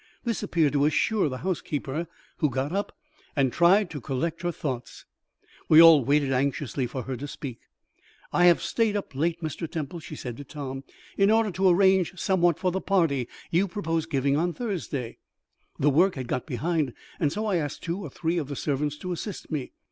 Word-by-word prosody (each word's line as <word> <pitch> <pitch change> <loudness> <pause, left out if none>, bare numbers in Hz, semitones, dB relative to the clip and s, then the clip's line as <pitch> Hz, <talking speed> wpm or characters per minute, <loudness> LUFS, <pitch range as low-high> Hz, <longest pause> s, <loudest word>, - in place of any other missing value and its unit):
This 235 -2 -1
appeared 165 -8 +1
to 145 0 +3
assure 170 +4 +2
the 130 - -4
housekeeper, 155 -3 -2 0.3
who 150 - +2
got 135 +3 -2
up 200 +2 -3 0.4
and 135 -4 +2
tried 180 +2 +4
to 145 -4 -6
collect 155 +7 -2
her 175 -1 -1
thoughts. 130 -7 -5 0.6
We 155 - +8
all 165 -4 +9
waited 140 +1 +2
anxiously 135 0 -1
for 125 +1 -5
her 130 - -4
to 140 +4 -6
speak. 135 -4 -7 0.7
"I 175 - +4
have 175 -1 +5
stayed 225 -3 +1
up 195 - -6
late, 165 +5 -1
Mr. 160 +1 -4
Temple," 160 +1 -4
she 155 - -9
said 120 -4 -6
to 145 - -7
Tom, 135 -2 -6 0.4
"in 195 +1 +5
order 220 -1 +3
to 190 +1 +3
arrange 190 0 +3
somewhat 175 -4 +2
for 185 - 0
the 190 +2 -2
party 160 -11 +1 0.2
you 180 +4 +3
propose 165 -5 -2
giving 140 -2 +1
on 170 +3 +1
Thursday. 165 - -4 0.6
The 145 +2 +3
work 180 +7 +4
had 130 -3 -5
got 125 0 -2
behind, 150 0 -1 0.3
and 150 -3 +1
so 215 +6 -2
I 200 -4 +1
asked 145 -4 -4
two 170 +3 -2
or 170 - -6
three 165 +5 -1
of 150 - -4
the 140 - -5
servants 145 +1 -1
to 180 +4 -5
assist 180 +3 -6
me." 145 -5 -3
160 Hz, 195 wpm, -26 LUFS, 140-180 Hz, 0.7 s, all